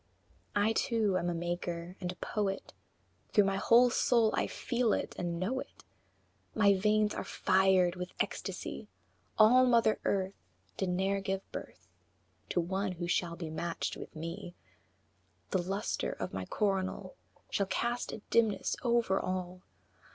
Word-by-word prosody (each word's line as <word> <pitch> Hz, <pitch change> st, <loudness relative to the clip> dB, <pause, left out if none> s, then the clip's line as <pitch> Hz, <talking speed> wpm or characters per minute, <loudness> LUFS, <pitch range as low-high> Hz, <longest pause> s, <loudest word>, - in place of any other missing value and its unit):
VI. 205 Hz, -, +3 dB
I -, -, +1 dB
too 220 Hz, -4 st, +1 dB
am 175 Hz, -, -1 dB
a -, -, 0 dB
Maker 175 Hz, +1 st, -3 dB
and 180 Hz, -1 st, -2 dB
a -, -, -10 dB
Poet; 195 Hz, +2 st, -3 dB, 0.6 s
Through 210 Hz, -, +5 dB
my 195 Hz, 0 st, 0 dB
whole 240 Hz, +4 st, +5 dB
soul 235 Hz, -3 st, +3 dB
I -, -, +1 dB
feel 240 Hz, -3 st, 0 dB
it -, -, -2 dB
and 170 Hz, -1 st, -3 dB
know 230 Hz, +9 st, -1 dB
it; -, -, -10 dB, 0.7 s
My 205 Hz, -2 st, +5 dB
veins 210 Hz, +2 st, +2 dB
are -, -, -3 dB
fired 185 Hz, -2 st, +3 dB
with 180 Hz, 0 st, -5 dB
ecstasy! -, -, -3 dB, 0.5 s
All 235 Hz, +4 st, +7 dB
mother 230 Hz, -3 st, +4 dB
Earth 190 Hz, -1 st, 0 dB, 0.4 s
Did 190 Hz, -, -1 dB
ne'er 195 Hz, +2 st, 0 dB
give 195 Hz, 0 st, -2 dB
birth -, -, -8 dB, 0.6 s
To -, -, +1 dB
one 190 Hz, +3 st, -1 dB
who 175 Hz, -1 st, -4 dB
shall 175 Hz, -1 st, 0 dB
be 165 Hz, -2 st, -6 dB
matched 165 Hz, +1 st, -3 dB
with -, -, -9 dB
me; 170 Hz, +3 st, -6 dB, 1.0 s
The 185 Hz, -, +2 dB
lustre 195 Hz, +4 st, -2 dB
of -, -, -5 dB
my 95 Hz, -1 st, -3 dB
coronal 195 Hz, -, -1 dB, 0.4 s
Shall 200 Hz, -, +1 dB
cast 240 Hz, +4 st, -1 dB
a 210 Hz, -, -8 dB
dimness 225 Hz, -3 st, +2 dB
over 235 Hz, -5 st, +2 dB
all. 185 Hz, -1 st, -3 dB
190 Hz, 150 wpm, -32 LUFS, 180-215 Hz, 1.0 s, All